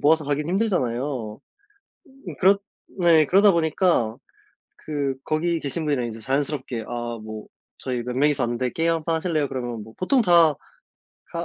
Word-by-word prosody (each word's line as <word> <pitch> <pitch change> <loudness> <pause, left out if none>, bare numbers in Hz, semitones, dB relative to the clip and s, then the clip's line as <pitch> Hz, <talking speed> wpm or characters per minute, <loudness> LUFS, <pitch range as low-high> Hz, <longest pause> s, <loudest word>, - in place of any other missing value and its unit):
모아서 155 +1 +3
하긴 145 +2 -1
힘들잖아요. 130 - -1 0.9
음 165 - -6
그렇 195 +2 +5 0.4
네 165 -3 +5
그러다 195 +5 +5
보니까 160 - +1 0.6
그 140 -3 -3
거기 165 +2 0
계신 150 +3 -3
분이랑 140 -5 0
인제 115 -1 -6
자연스럽게 130 -2 -2
"아 120 -1 -4
뭐 110 0 -8 0.3
저희 125 -2 -3
몇 125 0 -5
명이서 145 -1 +2
왔는데 120 +1 -1
게임 165 +1 +1
한판 165 0 -1
하실래요?" 160 -3 0
그러면 120 -4 -4
뭐 110 +1 -14
보통 250 +8 +2
다 170 -6 +5 0.8
다 170 0 -3
145 Hz, 325 characters per minute, -23 LUFS, 120-165 Hz, 0.9 s, 그렇